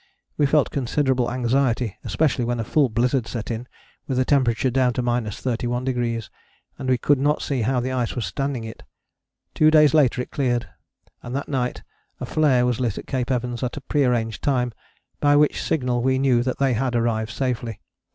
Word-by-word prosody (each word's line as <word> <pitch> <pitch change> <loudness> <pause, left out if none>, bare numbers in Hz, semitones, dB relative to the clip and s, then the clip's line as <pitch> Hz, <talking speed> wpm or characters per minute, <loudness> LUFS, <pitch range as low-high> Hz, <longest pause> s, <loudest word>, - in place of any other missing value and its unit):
We 145 - +2
felt 145 0 +2
considerable 130 -2 0
anxiety, 125 -2 0
especially 150 -5 0
when 120 0 -1
a - - -1
full 140 +3 +2
blizzard 120 +2 0
set 115 -1 -5
in 115 +2 -5 0.4
with 130 - -1
a 130 - +2
temperature 130 -2 +2
down 125 -1 +2
to 125 - -2
31°, 120 0 -2 0.5
and 130 - -3
we 130 - +3
could 145 +2 +2
not 145 +2 +1
see 135 -4 -1
how 125 +3 +1
the 130 +2 -2
ice 125 -3 -1
was 120 - -2
standing 135 -4 -3
it. 110 0 -9 0.7
Two 155 - +5
days 150 -3 +5
later 140 -6 +3
it - - -14
cleared, 120 -4 0 0.5
and 125 +1 -6
that 140 - -3
night 125 -3 -2 0.4
a - - -4
flare 135 -6 +2
was 125 -2 0
lit 120 -5 -1
at - - -6
Cape 130 -2 -2
Evans 125 -2 -2
at 125 +1 -3
a - - -5
pre 145 +2 0
arranged 115 -3 0
time, 125 -4 0 0.5
by 145 0 +4
which 150 0 +3
signal 125 -5 0
we 130 +1 +2
knew 130 -3 +3
that 130 +1 -2
they 135 -2 +2
had 125 +1 -1
arrived 115 -2 0
safely. 120 -3 -3
125 Hz, 190 wpm, -23 LUFS, 120-135 Hz, 0.7 s, Two